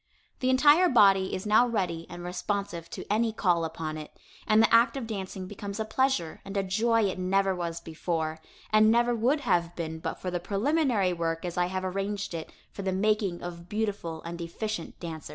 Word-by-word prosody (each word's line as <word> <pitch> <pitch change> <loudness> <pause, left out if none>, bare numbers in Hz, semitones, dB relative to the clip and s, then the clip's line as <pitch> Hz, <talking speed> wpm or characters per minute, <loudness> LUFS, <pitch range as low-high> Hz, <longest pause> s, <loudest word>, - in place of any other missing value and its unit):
The 255 - +1
entire 295 +7 +6
body 195 -6 +5
is 185 - -5
now 215 +4 +5
ready 180 -8 -2
and 175 0 -8
responsive 180 -1 -3
to - - -7
any 220 +2 +1
call 175 -6 +1
upon 160 -1 -4
it, 150 - -8 0.4
and 215 - +5
the 225 - +4
act 230 +4 +5
of 260 - -4
dancing 190 -3 -5
becomes 200 +2 -7
a 220 - -1
pleasure 260 -8 0
and 195 0 -5
a 195 - +2
joy 225 +4 +2
it 190 -2 -1
never 195 +1 +2
was 170 -2 -3
before, 160 -1 -3 0.3
and 215 0 +6
never 240 +1 +3
would 250 +6 +1
have 175 -9 +1
been 160 -1 -4
but - - -3
for 180 - -4
the 175 - -1
preliminary 210 - +1
work 165 0 -2
as 175 - -4
I 175 0 +1
have 185 +1 -3
arranged 195 +1 -3
it 165 -1 -6 0.2
for - - -7
the 190 -1 -1
making 195 -2 0
of 170 0 -8
beautiful 205 -7 -3
and 170 +1 -6
efficient 170 +2 -5
dancers. 160 -4 -7
195 Hz, 200 wpm, -28 LUFS, 170-220 Hz, 0.4 s, entire